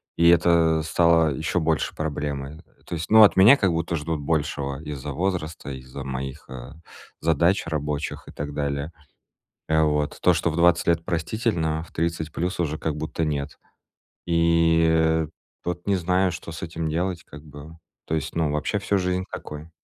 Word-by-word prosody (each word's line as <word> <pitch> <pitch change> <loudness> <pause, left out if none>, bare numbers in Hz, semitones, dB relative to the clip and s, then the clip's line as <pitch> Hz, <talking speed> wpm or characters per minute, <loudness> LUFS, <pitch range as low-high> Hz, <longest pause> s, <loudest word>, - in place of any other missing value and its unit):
И 85 0 +5
это 85 -2 +4
стало 80 -1 +3
ещё 80 +5 -1
больше 80 -1 0
проблемой. 75 -1 -4 0.2
То - - -8
есть, 80 +1 -5
ну, 110 0 +9
от 105 - +6
меня 105 +9 +8
как 95 -7 +2
будто 85 0 -1
ждут 75 0 -3
большего 75 -2 -2
из-за 75 -2 -6
возраста, 85 -2 -3
из-за 65 +1 -8
моих, 65 0 -5
э, 65 +3 -9 0.4
задач 85 +4 +2
рабочих 75 -1 -3
и - - -10
так 75 0 -6
далее. 70 +2 -3 0.7
Э, 80 0 +3
вот. 75 -1 0
То, 90 - +5
что 85 0 0
в 80 - -5
20 85 0 +3
лет 85 -1 +2
простительно, 80 -2 -1
в - - -15
30 80 -1 -2
плюс 90 +1 -3
уже 80 -2 -1
как 80 -2 -3
будто 80 +1 -3
нет. 75 -1 -3 0.7
И, 85 -1 +3
э, 80 -1 +2 0.4
вот 90 +2 -4
не 100 - +3
знаю, 90 +1 +1
что 85 0 -8
с 80 - -8
этим 80 -1 -3
делать, 85 +2 -2
как 75 - -12
бы. 75 +2 -12 0.3
То 80 - -1
есть 80 +1 -4
ну 80 -3 +1
вообще 75 +8 -1
всю 100 +1 0
жизнь 90 0 -1
такой. 75 +2 -8
80 Hz, 175 wpm, -24 LUFS, 75-85 Hz, 0.7 s, ну